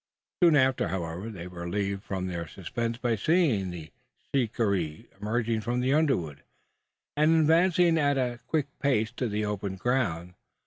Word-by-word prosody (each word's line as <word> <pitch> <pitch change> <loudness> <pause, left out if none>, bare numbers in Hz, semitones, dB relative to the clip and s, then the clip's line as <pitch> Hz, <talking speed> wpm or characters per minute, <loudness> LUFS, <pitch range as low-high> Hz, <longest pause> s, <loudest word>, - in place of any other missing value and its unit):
Soon 170 -3 +6
after, 130 -6 +3
however, 90 +3 -4
they 95 -6 -7
were 90 -1 -9
relieved 100 +2 -2
from 95 -2 -3
their 85 -2 -4
suspense, 115 +7 -4
by 120 -2 0
seeing 125 - +2
the 85 -3 -8 0.4
shikaree 100 - 0 0.2
emerging 115 +1 0
from 120 +3 -1
the 130 +2 +1
underwood, 90 - +1 0.7
and 155 +2 +4
advancing 165 +1 +4
at 145 -2 +2
a 125 -2 -1
quick 155 -3 +1
pace 115 -6 +1
to 125 0 -2
the 105 +1 -1
open 100 -2 -3
ground. 95 -6 -1
115 Hz, 150 wpm, -28 LUFS, 95-135 Hz, 0.7 s, Soon